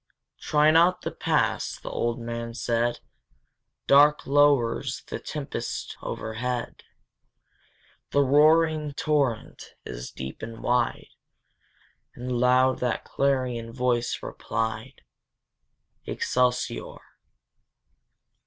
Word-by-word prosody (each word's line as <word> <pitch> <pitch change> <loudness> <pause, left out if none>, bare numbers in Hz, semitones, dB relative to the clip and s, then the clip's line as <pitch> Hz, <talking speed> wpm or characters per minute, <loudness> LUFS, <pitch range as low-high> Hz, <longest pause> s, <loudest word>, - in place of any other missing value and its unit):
"Try 150 +1 +3
not 170 +3 +4
the - - -3
Pass!" - - 0
the - - -7
old 120 0 -1
man 115 0 -5
said: 120 0 -1 0.8
"Dark 145 +2 +5
lowers 140 -5 +2
the - - -5
tempest - - -5
overhead, 120 +2 -4 1.3
The 140 - +3
roaring 155 +2 +4
torrent 140 -8 -1
is - - -7
deep 65 0 -8
and 115 +1 -8
wide! 120 -1 0 1.1
And 125 +1 -6
loud 125 +1 +3
that 125 -2 -1
clarion 125 -4 -1
voice 120 -1 -1
replied, 110 -1 -4 1.0
Excelsior! 125 0 -1
125 Hz, 90 wpm, -26 LUFS, 115-145 Hz, 1.3 s, Dark